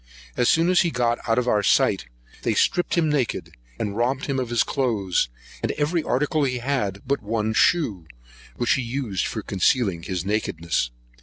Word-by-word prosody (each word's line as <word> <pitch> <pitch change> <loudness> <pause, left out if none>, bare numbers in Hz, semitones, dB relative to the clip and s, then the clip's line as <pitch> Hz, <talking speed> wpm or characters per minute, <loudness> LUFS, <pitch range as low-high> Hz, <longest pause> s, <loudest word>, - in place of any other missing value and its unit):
As 125 - +2
soon 165 +2 +3
as 180 - +5
he 170 - +1
got 120 -4 0
out 115 - +3
of 125 0 +1
our 105 -4 +3
sight, - - +2 0.3
they - - 0
stripped 175 - +2
him 165 -2 +3
naked, 145 -6 -1 0.2
and 100 -1 -3
robbed 125 +4 0
him 135 -2 -1
of 125 -2 -3
his 120 -1 +3
cloaths, 105 - 0 0.3
and - - 0
every 155 +3 0
article 150 +2 0
he 130 -2 0
had, 120 -7 -2
but 140 +2 0
one 110 +1 -1
shoe, 110 - +2 0.5
which 120 - +2
he 130 - 0
used 120 -6 -2
for - - -4
concealing 95 -1 +1
his 90 +1 -4
nakedness. 85 - -1
120 Hz, 180 wpm, -24 LUFS, 100-140 Hz, 0.5 s, as